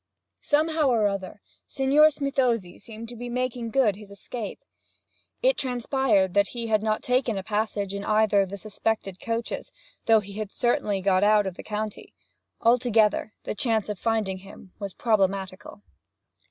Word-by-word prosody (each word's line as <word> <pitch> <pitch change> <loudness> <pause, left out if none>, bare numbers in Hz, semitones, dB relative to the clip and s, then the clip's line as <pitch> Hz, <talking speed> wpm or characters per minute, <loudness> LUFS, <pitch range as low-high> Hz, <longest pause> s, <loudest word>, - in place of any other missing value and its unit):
Somehow 310 0 +2
or 225 -5 +3
other 195 0 -5 0.2
Signor 280 +3 +5
Smithozzi 260 - -1
seemed 225 +2 -9
to 240 - -9
be 245 +1 -6
making 245 -1 -2
good 225 -5 +3
his 205 0 -12
escape. 205 +2 -6 0.9
It - - +4
transpired 245 -6 +1
that 200 0 +3
he 235 - -2
had 215 -2 +2
not 215 0 -1
taken 250 -3 +1
a 190 - -3
passage 210 -1 -2
in 200 0 -4
either 215 -1 +3
of 195 - -2
the 200 - -6
suspected 205 -2 -3
coaches, 230 0 -3 0.4
though 225 -1 +6
he 200 -1 -9
had 210 -2 -4
certainly 210 -5 0
got 190 0 +3
out 210 0 +5
of 190 - -3
the - - -9
county; 215 0 -5 0.5
altogether, 230 -3 +3
the - - -3
chance 220 -1 0
of 205 -3 -4
finding 215 -5 0
him 195 0 -14
was 200 -3 -6
problematical. 195 -3 -1
215 Hz, 160 wpm, -26 LUFS, 200-240 Hz, 0.9 s, though